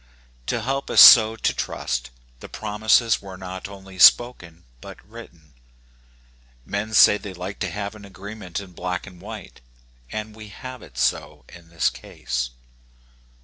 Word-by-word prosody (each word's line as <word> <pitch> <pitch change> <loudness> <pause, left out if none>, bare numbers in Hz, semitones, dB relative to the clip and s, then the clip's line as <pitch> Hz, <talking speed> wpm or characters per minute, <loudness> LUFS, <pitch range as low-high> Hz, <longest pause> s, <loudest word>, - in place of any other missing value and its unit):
To - - -2
help 135 +2 -3
us - - +3
so 110 -2 +9
to - - -1
trust, 60 +2 -4 0.3
the - - -11
promises 110 +2 +1
were 95 -2 -10
not 95 0 -8
only 95 -1 -13
spoken 90 -8 +4 0.2
but - - -11
written. 75 -4 -14 1.1
Men 110 +2 -4
say 105 - +6
they 95 -2 -9
like 90 +3 -7
to 100 - -2
have 100 +3 -5
an 105 -1 -14
agreement 100 -1 -8
in 100 -2 -11
black 90 +1 -5
and 90 -3 -14
white, - - -10 0.5
and 110 0 -6
we 110 -1 -11
have 130 +4 -10
it 65 -4 -16
so - - -2
in 85 -1 -15
this 85 -1 0
case. - - -5
100 Hz, 150 wpm, -22 LUFS, 90-110 Hz, 1.1 s, so